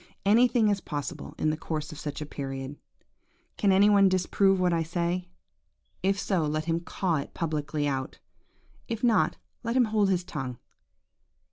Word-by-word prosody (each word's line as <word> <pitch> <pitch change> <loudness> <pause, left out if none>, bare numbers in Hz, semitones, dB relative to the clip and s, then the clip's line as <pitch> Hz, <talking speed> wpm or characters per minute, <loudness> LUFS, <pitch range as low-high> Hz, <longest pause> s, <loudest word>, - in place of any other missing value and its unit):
Anything 235 +2 +4
is 200 -2 0
possible 145 -5 -5
in 155 - +1
the - - -1
course 155 -1 -4
of 155 - -9
such 145 0 -5
a - - -3
period. 135 -1 -5 0.8
Can 200 - +2
any 195 +2 +6
one 200 -2 +6
disprove 190 +1 +2
what 180 -1 +2
I 165 - +1
say? 175 +2 -2 0.7
If 195 +1 +1
so, 190 -5 0
let 155 +1 -1
him 165 0 0
caw 170 -1 -1
it 140 - -6
publicly 150 -2 -1
out; 135 -2 -3 0.7
if 230 0 -4
not, 235 -2 +3 0.2
let 230 0 -2
him 250 - +5
hold 205 -2 +3
his 180 -2 +1
tongue. 135 -8 -5
170 Hz, 165 wpm, -28 LUFS, 150-195 Hz, 0.8 s, any